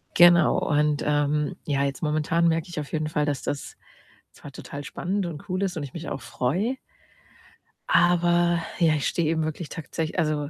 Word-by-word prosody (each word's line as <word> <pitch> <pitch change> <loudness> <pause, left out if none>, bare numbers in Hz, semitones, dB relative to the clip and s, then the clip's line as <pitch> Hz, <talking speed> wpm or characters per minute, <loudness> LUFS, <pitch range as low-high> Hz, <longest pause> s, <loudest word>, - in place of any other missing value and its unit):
Genau, 175 -2 +6
und, 150 -1 +1
ähm, 150 0 +1
ja, 140 -2 0
jetzt 140 +4 -3
momentan 155 +2 +1
merke 165 0 +1
ich 175 -2 -4
auf 150 - -6
jeden 155 -1 -1
Fall, 150 -1 0
dass 145 -3 -2
das 145 - -4 0.6
zwar 145 - -12
total 145 +1 -8
spannend 190 +6 -3
und 165 +1 -8
cool 185 +2 -1
ist 190 -2 -1
und 155 - -3
ich 135 - -9
mich 165 - -6
auch - - -4
freue 160 - -1 1.1
aber 175 -1 +3 0.2
ja, 165 -3 +4
ich 145 - -1
stehe 165 -3 0
eben 160 -1 +1
wirklich 155 +1 -4
tagtsech 160 +1 -4
also 150 -3 0
155 Hz, 185 wpm, -25 LUFS, 145-175 Hz, 1.1 s, Genau